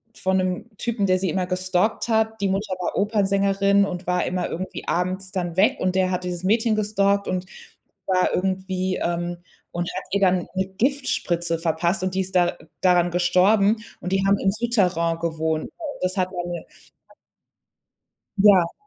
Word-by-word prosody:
von 190 0 0
'nem 185 -1 -2
Typen, 230 -2 -1
der 185 0 +3
sie 190 0 -1
immer 180 +2 -1
gestalkt 185 +4 0
hat, 220 -1 +1
die 200 - +1
Mutter 195 +1 -1
war 180 - -3
Opernsängerin 200 -1 +2
und 180 -2 -6
war 180 0 +1
immer 180 0 -1
irgendwie 185 +3 -6
abends 185 +2 -1
dann 175 -3 -3
weg, 200 +4 +4
und 185 0 0
der 185 -1 +2
hat 180 0 -2
dieses 180 -1 -4
Mädchen 220 +3 +2
gestalkt 200 -1 +1
und, 185 0 -2 0.6
war 185 -1 +2
irgendwie, 185 0 -1
ähm 175 0 -2 0.3
und 175 0 -3
hat 185 - -2
ihr 200 - +1
dann 185 -2 +2
eine 190 0 +1
Giftspritze 190 - -1
verpasst 170 +2 0
und 185 0 -2
die 190 - +2
ist 190 0 -6
da 175 -1 +3 0.2
daran 175 -1 +3
gestorben, 195 +5 +3 0.2
und 180 - -4
die 195 0 +2
haben 200 0 +3
im 195 - +2
Soutterain 185 -7 0
gewohnt. 160 -1 -2 0.3
Das 185 +1 -1
hat 185 -1 +1
eine 175 -2 -5 1.7
Ja. 195 -4 +5
185 Hz, 165 wpm, -23 LUFS, 180-200 Hz, 1.7 s, Ja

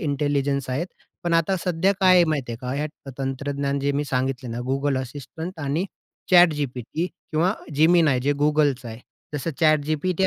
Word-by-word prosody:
Intelligence 140 -2 0
आहेत. 145 +7 -1 0.4
पण 170 -1 -1
आता 165 +3 +2
सध्या 180 +2 +2
काय 185 -1 +6
आहे 175 - +6
माहिती 140 -6 -1
आहे - - -5
का? 125 0 -4
ह्या 145 -1 -5
तंत्रज्ञान 140 +1 -2
जे 140 +1 0
मी 145 +1 -1
सांगितल 130 -1 -2
ना 115 - -4
Google 135 0 0
Assistant 155 +7 -8
आणि 150 +6 0 0.5
ChatGPT 150 -3 +3 0.3
किंवा 170 +6 +2 0.2
Gemini 160 -4 +5
जे 145 +2 +2
Googleचं 145 -5 +2
आहे. 115 +1 -9 0.3
जसं 145 +3 -2
ChatGPT 155 +4 +2
145 Hz, 160 wpm, -24 LUFS, 135-165 Hz, 0.5 s, काय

